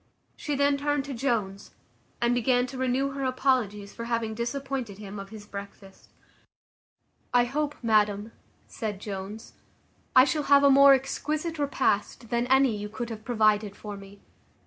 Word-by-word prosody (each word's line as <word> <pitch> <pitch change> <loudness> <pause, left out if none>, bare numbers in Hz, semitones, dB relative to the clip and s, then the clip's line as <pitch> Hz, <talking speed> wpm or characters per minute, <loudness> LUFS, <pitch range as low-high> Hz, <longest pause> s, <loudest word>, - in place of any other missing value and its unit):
She 295 - -3
then 280 0 +2
turned 290 -1 -1
to 280 - -5
Jones, 230 -6 -2 0.4
and 240 0 +2
began 245 +1 +2
to 260 +1 -8
renew 260 +2 0
her 275 0 -4
apologies 255 -6 0
for 230 - -6
having 230 -2 -1
disappointed 245 -2 -4
him 205 -1 -8
of 195 0 -8
his 215 -2 -10
breakfast. 200 -1 -11 1.3
"I 245 - +6
hope, 290 +4 -2
madam," 210 -1 +2 0.4
said 210 -4 -5
Jones, 200 +1 -7 0.6
"I 255 - +9
shall 290 +3 0
have 280 0 +7
a 280 - +6
more 275 0 +8
exquisite 305 +4 -3
repast 245 -5 -1
than 240 +1 0
any 265 -3 +4
you 210 0 -5
could 235 +2 -5
have 215 -1 -7
provided 215 -3 +2
for 210 -1 -7
me. 200 0 -13
235 Hz, 155 wpm, -27 LUFS, 210-270 Hz, 1.3 s, I